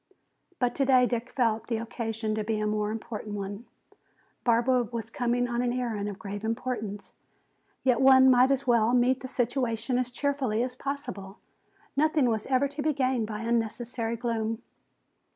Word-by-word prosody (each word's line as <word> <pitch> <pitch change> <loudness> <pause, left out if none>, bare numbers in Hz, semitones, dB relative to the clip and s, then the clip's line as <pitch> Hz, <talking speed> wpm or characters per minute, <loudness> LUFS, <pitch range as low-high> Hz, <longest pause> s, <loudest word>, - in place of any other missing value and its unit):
But 245 -1 +1
today 260 -2 +4
Dick 240 0 -2
felt 225 -4 0
the 230 - -1
occasion 225 -1 -3
to 215 0 -1
be 215 0 -1
a 215 - -1
more 210 0 0
important 215 -1 -5
one. 200 +3 -5 0.8
Barbara 245 +1 +3
was 230 -1 -5
coming 245 +1 0
on 240 0 -1
an 245 -1 0
errand 230 -5 -2
of 200 - -7
grave 205 0 -6
importance. 220 -4 -4 0.7
Yet 255 -1 +3
one 265 0 +7
might 250 +1 +5
as 275 0 +1
well 235 -1 +3
meet 250 +1 +3
the 260 - -6
situation 245 -1 -1
as 250 -1 -1
cheerfully 260 -4 0
as 250 0 -3
possible. 250 -8 -6 0.6
Nothing 295 -4 +3
was 220 -1 -2
ever 270 +1 +2
to 285 +1 -6
be 305 +1 +1
gained 255 -4 0
by 210 0 -5
unnecessary 230 0 -1
gloom. 225 -1 -2
240 Hz, 165 wpm, -28 LUFS, 220-255 Hz, 0.8 s, one